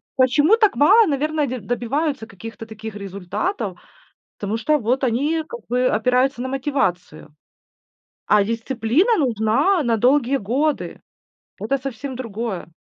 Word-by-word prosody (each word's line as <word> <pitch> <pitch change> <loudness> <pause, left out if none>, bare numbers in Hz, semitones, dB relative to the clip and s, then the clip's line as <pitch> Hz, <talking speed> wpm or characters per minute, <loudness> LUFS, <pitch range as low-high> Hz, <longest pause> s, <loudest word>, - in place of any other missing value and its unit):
Почему 290 - +4
так 425 -3 +3
мало, 410 +8 +6
наверное, 300 +1 0
дь 245 -5 -6
добиваются 245 +2 -2
каких-то 225 +2 -10
таких 220 -1 -8
результатов? 200 - -4 0.6
Потому 205 +2 -2
что 300 +7 +2
вот 250 +4 0
они 290 +7 0
как 480 - -7
бы 250 +1 +1
опираются 250 +3 +1
на 260 - -3
мотивацию, 255 - -2 0.9
а 210 -1 +4
дисциплина 235 - +1
нужна 265 - +2
на 235 -2 +2
долгие 260 +3 +3
годы. 270 +8 -1 0.6
Это 250 +6 -1
совсем 265 0 -6
другое. 225 -6 -5
250 Hz, 125 wpm, -21 LUFS, 220-290 Hz, 0.9 s, мало